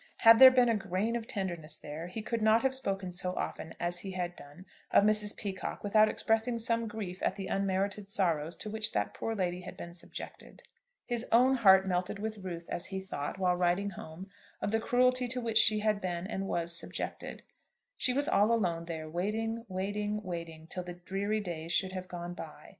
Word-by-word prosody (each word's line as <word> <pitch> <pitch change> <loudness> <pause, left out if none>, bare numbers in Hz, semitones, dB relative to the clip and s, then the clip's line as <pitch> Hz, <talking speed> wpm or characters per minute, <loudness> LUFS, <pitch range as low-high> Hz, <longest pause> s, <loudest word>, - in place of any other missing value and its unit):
Had 225 0 +9
there 260 - +12
been 255 -1 +4
a 230 - +3
grain 210 +2 -1
of 230 -1 -3
tenderness 175 -6 -3
there, 155 +3 -7
he 210 +5 -6
could 230 0 -2
not 220 +2 +4
have 265 0 +2
spoken 195 -7 -2
so 180 +1 -3
often 160 - -4
as 175 0 -2
he 190 -1 -6
had 175 -1 -3
done 145 +6 -13 0.2
of - - +5
Mrs. 210 0 +2
Peacocke 195 -3 -4
without 215 +1 +5
expressing 225 +3 +1
some 230 0 +1
grief 205 -4 -6
at - - 0
the 195 - -5
unmerited 195 +1 -1
sorrows 170 -5 +1
to 215 - -6
which 220 0 -2
that 105 -1 0
poor 225 - -3
lady 180 -2 -1
had 180 - -9
been 170 - -8
subjected. 175 - -9 0.4
His 240 -1 -1
own 250 +3 +6
heart 190 -4 +6
melted 180 +2 -1
with 215 +1 -4
ruth 175 -3 -6
as 175 - -3
he 190 -1 -4
thought, 190 -4 -5
while 180 -2 +2
riding 180 +3 +1
home, 170 +1 -9 0.3
of - - -2
the 225 - +2
cruelty 250 +2 +3
to 250 +1 -2
which 230 -2 +2
she 215 -1 +4
had 210 -1 +1
been 175 -1 -2
and 195 -1 -3
was 170 -1 -1
subjected. - - -4 0.5
She 255 - +1
was 285 +3 +1
all 205 +3 +4
alone 175 -7 +1
there, 160 -2 -5
waiting, 220 +7 -2
waiting, 205 +3 -2
waiting, 170 -3 -6
till 180 +3 -5
the 175 0 -7
dreary 195 +4 -2
days 170 -3 -4
should 190 -1 +1
have 185 -1 -5
gone 175 -1 -6
by. - - -10
195 Hz, 205 wpm, -31 LUFS, 175-220 Hz, 0.5 s, there